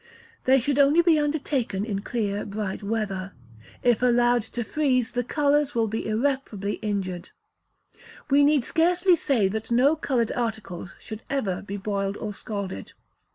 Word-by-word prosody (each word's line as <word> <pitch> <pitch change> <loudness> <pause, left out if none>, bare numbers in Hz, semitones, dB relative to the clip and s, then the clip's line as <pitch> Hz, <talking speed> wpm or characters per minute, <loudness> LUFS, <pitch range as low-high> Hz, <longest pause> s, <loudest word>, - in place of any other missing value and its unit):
They 265 +1 +5
should 280 +3 0
only 290 +5 +5
be 330 -3 +4
undertaken 280 -9 -1
in 200 -3 -3
clear 205 -2 -2
bright 205 -1 -4
weather. 200 -3 -3 0.5
If 240 -2 +3
allowed 240 -1 +3 0.2
to 240 - 0
freeze, 255 -3 0
the 245 - -1
colours 290 +2 +1
will 225 -1 +2
be 220 +1 -3
irreparably 220 -4 -1
injured. 185 -4 -3 1.0
We 285 +1 +6
need 290 -2 +4
scarcely 350 +4 +3
say 270 - +1
that 220 +2 -4
no 255 +6 +4
coloured 255 -7 0
articles 220 -7 -4
should 220 0 -9
ever 210 -10 -1
be 200 0 -6
boiled 200 0 -2
or 210 -1 -5
scalded. 200 - -6
230 Hz, 150 wpm, -25 LUFS, 205-280 Hz, 1.0 s, We